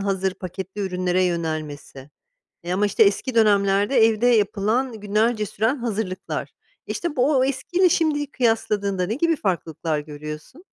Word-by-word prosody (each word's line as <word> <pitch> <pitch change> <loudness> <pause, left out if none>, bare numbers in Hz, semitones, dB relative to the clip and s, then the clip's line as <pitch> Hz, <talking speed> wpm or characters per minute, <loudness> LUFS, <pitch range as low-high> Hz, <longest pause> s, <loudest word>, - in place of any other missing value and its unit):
hazır 190 -1 -1
paketli 190 +2 -7
ürünlere 185 -1 0
yönelmesi. 155 -5 -4 0.5
E, 175 +1 -4
ama, 205 +3 +2
işte, 205 - +3
eski 205 +5 +2
dönemlerde 205 +1 +3
evde 225 +2 +1
yapılan, 220 +2 +2
günlerce 215 +1 +1
süren 225 +9 0
hazırlıklar. 215 -6 -4 0.4
İşte, 340 -4 -4
bu 270 +3 +3
o 260 - +4
eskiyle 350 +8 +1
şimdiyi 295 -4 0
kıyasladığında 205 -6 0
ne 220 - -2
gibi 330 +3 +1
farklılıklar 165 - -2
görüyorsun? 150 - -9
205 Hz, 135 wpm, -23 LUFS, 185-245 Hz, 0.5 s, o